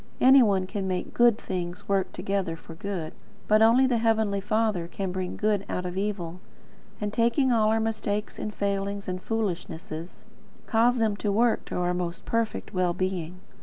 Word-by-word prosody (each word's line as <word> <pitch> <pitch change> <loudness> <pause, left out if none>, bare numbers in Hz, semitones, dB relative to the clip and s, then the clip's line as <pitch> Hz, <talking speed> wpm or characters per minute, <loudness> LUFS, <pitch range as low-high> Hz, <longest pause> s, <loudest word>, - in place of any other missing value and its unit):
Any 265 +1 +8
one 195 -5 +3
can 195 0 -4
make 185 -1 -3
GOOD 240 -2 +5
things 180 0 -5
work 195 -1 +1
together 195 -2 -2
for 165 0 -12
good: 170 -2 -5 0.3
but 215 +1 +4
only 235 +4 +6
the 245 -3 +2
Heavenly 220 -3 +2
Father 210 -4 0
can 190 +1 -4
bring 185 0 -4
good 210 -2 +1
out 180 - -2
of 180 0 -4
evil; 190 -4 -3 0.6
and, 210 0 -3
taking 235 +4 +2
all 220 -2 +3
our 220 +1 +2
mistakes 215 -1 -2
and 215 - -3
failings 200 0 -2
and 185 0 -3
foolishnesses, 175 -6 -4 0.4
cause 240 +2 +3
them 220 -3 +1
to 205 - -1
work 230 +3 +2
to - - -6
our 180 0 0
most 175 -1 -4
perfect 230 -1 -2
well 180 -2 +1
being. 180 -1 -3
200 Hz, 175 wpm, -27 LUFS, 180-220 Hz, 0.6 s, Any